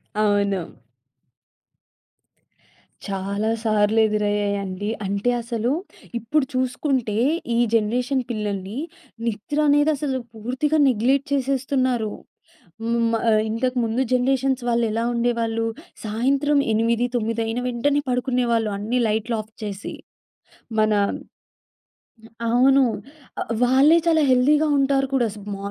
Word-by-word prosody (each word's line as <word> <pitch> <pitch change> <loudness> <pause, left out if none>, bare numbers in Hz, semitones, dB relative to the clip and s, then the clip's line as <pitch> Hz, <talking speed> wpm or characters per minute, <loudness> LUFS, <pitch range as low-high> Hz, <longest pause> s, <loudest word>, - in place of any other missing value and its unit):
అవును. 200 -4 0 2.3
చాలా 200 +2 -2
సార్లు 215 0 +2
ఎదురయ్యాయండి. 205 -1 -1 0.2
అంటే 200 +4 0
అసలు 235 +1 -2 0.5
ఇప్పుడు 275 +6 0
చూసుకుంటే, 255 -3 -1 0.4
ఈ - - +2 0.2
జనరేషన్ 245 +4 +1
పిల్లల్ని, 205 -1 -4 0.5
నిద్రనేది 290 +7 +2
అసలు 270 -2 -2 0.2
పూర్తిగా 255 +8 -1
నెగ్లెక్ట్ 260 +5 +1
చేసేస్తున్నారు. 260 -4 0 0.7
హ్మ్. 230 +1 0
మా 225 - +1 0.3
ఇంతకు 250 +3 -1
ముందు 225 +3 -1
జనరేషన్స్ 265 0 +1
వాళ్లెలా 230 -1 +1
ఉండేవాళ్ళు. 230 -1 0 0.4
సాయంత్రం 270 +7 +1 0.2
8, 230 +2 +1
తోమిదైన 230 0 -1
వెంటనే 280 +4 +1
పడుకునేవాళ్ళు 245 -3 +1
అన్నీ 225 +5 -1
లైటులు 220 +2 -1
ఆఫ్ 215 +1 -19
చేసి. 200 -1 -5 0.8
మన 215 0 +3 1.6
అవును. 265 +4 +5 0.6
ఆహ్, - - -5
వాళ్ళే 265 +6 +5
చాలా 325 -2 +3
హెల్తీ‌గా 290 +5 +4
ఉంటారు 275 0 +2
కూడా. 250 -3 +3
స్ - - -11 0.2
మ - - -5
235 Hz, 100 wpm, -22 LUFS, 215-265 Hz, 2.3 s, అవును